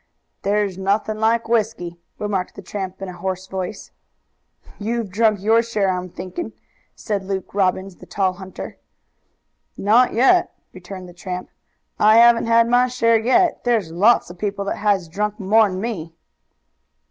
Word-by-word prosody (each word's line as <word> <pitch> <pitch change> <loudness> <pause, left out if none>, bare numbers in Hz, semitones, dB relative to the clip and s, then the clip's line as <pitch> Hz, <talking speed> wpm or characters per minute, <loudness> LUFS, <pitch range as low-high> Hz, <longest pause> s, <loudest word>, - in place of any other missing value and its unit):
"There's 200 -2 0
nothing 210 +3 0
like 225 +1 +1
whisky," 215 -7 -1 0.2
remarked 200 -3 -3
the 200 - -10
tramp 190 0 -6
in - - -4
a 180 - -7
hoarse 185 +1 -4
voice. 190 +2 -6 0.9
"You've 225 -1 -2
drunk 215 0 +2
your 225 +2 +4
share, 215 -4 -1
I'm 180 0 -4
thinking," 185 - -6 0.4
said 205 -3 -3
Luke 190 -1 -4
Robbins, 190 -1 0
the - - -14
tall 190 -2 0
hunter. 190 0 -9 1.0
"Not 230 +5 +4
yet," 270 +10 +3 0.2
returned 185 0 -9
the 175 - -13
tramp. 180 +1 -6 0.5
"I 215 +1 +6
haven't 235 0 +6
had 230 0 +4
my 245 +1 +4
share 230 -2 +2
yet. 290 +10 +2
There's 225 -9 +1
lots 195 +3 +3
of 175 - -14
people 200 0 -3
that - - -2
has 200 -4 +1
drunk 210 +5 -3
more'n 200 -1 +3
me." 180 -7 -5
205 Hz, 150 wpm, -21 LUFS, 185-225 Hz, 1.0 s, I